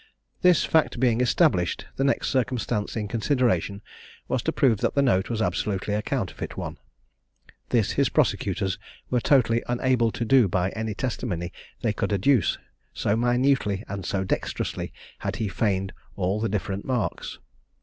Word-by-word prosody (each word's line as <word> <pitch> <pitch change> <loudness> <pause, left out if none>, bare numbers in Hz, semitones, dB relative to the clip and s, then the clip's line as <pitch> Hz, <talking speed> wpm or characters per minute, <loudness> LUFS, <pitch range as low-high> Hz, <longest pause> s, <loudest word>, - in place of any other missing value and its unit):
This 180 -2 +5
fact 160 -6 +2
being 120 -2 +3
established, 125 - +2
the 135 - 0
next 140 - +1
circumstance 120 -4 -1
in 105 -2 -2
consideration 110 - 0 0.4
was - - 0
to - - 0
prove 120 -7 +3
that - - 0
the 140 - +4
note 95 -8 +2
was 115 -2 0
absolutely 95 +3 -1
a 105 - 0
counterfeit 115 -5 -3
one. - - -5 0.9
This - - +2
his - - +2
prosecutors 95 -1 0 0.3
were 125 -1 +2
totally 120 -4 +3
unable 120 -1 +2
to 120 - -2
do 125 -2 +5
by 90 +1 0
any 110 -1 -3
testimony 100 -8 -3 0.3
they - - +2
could - - -2
adduce, 105 - +3 0.4
so 105 - +1
minutely 120 -3 +2
and 100 -1 -5
so 95 +2 -1
dexterously 95 - -2 0.3
had - - -3
he 110 - -2
feigned 95 -1 -1 0.2
all 95 +2 0
the 115 - 0
different 100 -1 -2
marks. 125 -4 -2
110 Hz, 155 wpm, -25 LUFS, 100-125 Hz, 0.9 s, This